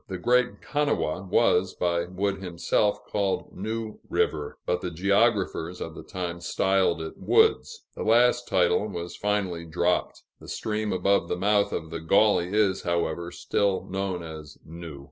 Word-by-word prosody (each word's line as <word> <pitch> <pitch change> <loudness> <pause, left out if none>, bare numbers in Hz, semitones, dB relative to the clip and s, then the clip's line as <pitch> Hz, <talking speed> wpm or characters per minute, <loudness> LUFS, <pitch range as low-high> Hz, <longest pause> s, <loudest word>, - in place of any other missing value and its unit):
The 95 - -4
Great 125 +6 +1
Kanawha 145 - 0
was, 95 -3 +3
by 85 -1 0
Wood 95 +2 -2
himself, 90 +3 0
called 100 -2 -2
New 110 +2 -4
River, 75 -2 -1
but 90 0 0
the 90 - -3
geographers 95 -1 +1
of - - -5
the - - -9
time 85 -2 -5
styled 95 -2 +1
it 80 - -8
Wood's. 445 +1 +2
The - - -6
last 120 +2 +3
title 95 +3 +2
was 85 -3 -6
finally 100 -5 -1
dropped; 85 +2 -1 0.2
the - - -13
stream 105 -1 -2
above 100 -1 +2
the 90 - -2
mouth 100 +2 +2
of 80 0 -4
the 85 - -4
Gauley 90 +1 +3
is, 100 -2 +2
however, 85 0 -1
still 100 +2 -1
known 95 -2 -2
as 80 -3 -9
New. 80 -3 -9
95 Hz, 155 wpm, -26 LUFS, 85-105 Hz, 0.2 s, was